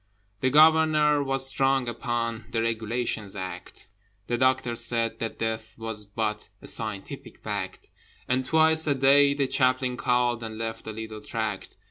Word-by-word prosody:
The 130 - +1
Governor 155 0 +5
was 135 -1 +2
strong 135 -1 +1
upon 120 -1 -3
The 115 -1 -1
Regulations 115 -2 -2
Act: 95 -2 -7 0.4
The 120 - -1
Doctor 130 -1 +1
said 115 -1 0
that 115 - -4
Death 110 0 -4
was 110 -2 -6
but 105 0 -3
A - - -14
scientific 105 -3 -2
fact: - - -5 0.4
And 130 +1 +1
twice 160 +3 +3
a 145 - +2
day 140 +1 +5
the 140 -1 +1
Chaplain 130 -1 +1
called 120 -1 +1
And 110 -1 -6
left 115 0 -5
a - - -3
little 110 0 -7
tract. 110 -3 -4
120 Hz, 150 wpm, -26 LUFS, 110-135 Hz, 0.4 s, Governor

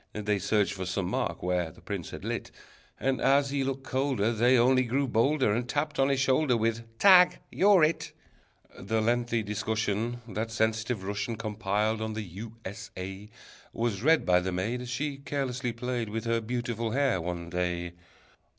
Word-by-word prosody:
They 105 -1 -1
searched 100 +1 +1
for 95 -2 -5
some 95 0 -1
mark - - -2
where 90 -2 0
the - - -17
prince - - -5
had - - -8
lit, - - -3 0.5
And 135 -1 0
as 140 0 +3
he 140 -1 0
looked 135 0 -3
colder, 130 -4 0
They 120 +3 +4
only 130 +2 +4
grew 130 +3 0
bolder, 130 0 +2
And 120 +2 -2
tapped 150 0 -1
on 135 +1 +4
his 135 -1 +1
shoulder 130 -1 +3
With: 115 0 -2
"Tag! 180 - +7
You're 195 -3 +5
It!" 155 +2 +1 0.7
The 110 +4 -1
lengthy 120 0 +1
discussion 110 +2 -2
That 110 +2 -3
sensitive 110 -1 -1
Russian 105 +4 -3
Compiled 110 0 -1
on 110 0 -3
the 110 0 -4
U. 105 +5 -9
S. 100 +1 -7
A. 95 +3 -7 0.4
Was 115 -4 -1
read 160 +5 +4
by 90 0 +4
the 95 +1 -3
maid, 105 +8 -2
As 125 - -7
she 140 +3 -2
carelessly 135 -3 -3
played 120 -1 -3
With 115 +2 -4
her 115 0 +1
beautiful 120 0 -2
hair 135 -9 +2
one 85 0 -5
day. 90 -1 -2
115 Hz, 180 wpm, -28 LUFS, 105-130 Hz, 0.7 s, Tag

